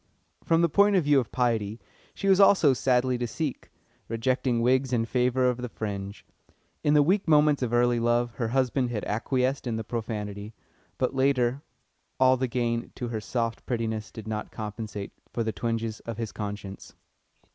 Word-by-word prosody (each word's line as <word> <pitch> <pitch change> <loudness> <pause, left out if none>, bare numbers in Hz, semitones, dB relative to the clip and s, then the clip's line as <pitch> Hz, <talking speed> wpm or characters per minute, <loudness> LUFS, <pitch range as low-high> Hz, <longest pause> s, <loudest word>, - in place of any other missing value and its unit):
From 165 0 +3
the - - +5
point 200 +5 +4
of 180 - +3
view 145 -1 +4
of 120 - -4
piety 115 -3 0 0.4
she 195 - -3
was 190 0 +5
also 190 -8 +6
sadly 125 -1 +1
to 120 - -1
seek, 145 +3 -4 0.4
rejecting 120 +1 0
wigs 130 +2 +2
in 115 -2 +1
favour 125 +1 +1
of 125 -1 +1
the 125 0 -5
fringe. 100 -2 -6 0.6
In 150 0 +3
the 145 - +6
weak 185 +5 +1
moments 150 -2 +4
of 125 -3 -1
early 120 0 +3
love 120 +1 +1
her 115 - -1
husband 130 +1 +1
had 110 -3 -3
acquiesced 130 +5 -1
in 115 - -1
the 110 - -3
profanity, 105 -2 -5 0.4
but 130 - 0
later 130 -1 +1 0.6
all 130 0 +5
the 130 0 -1
gain 120 -1 -2
to 120 - -4
her 110 -2 -3
soft 115 +1 -2
prettiness 110 -3 -2
did 110 -1 -9
not 105 -1 -4
compensate 105 -1 -6 0.2
for 115 - -1
the 110 -1 -2
twinges 115 +1 -2
of 115 -2 -7
his 115 -3 -4
conscience. 100 -2 -7
120 Hz, 180 wpm, -27 LUFS, 110-130 Hz, 0.6 s, also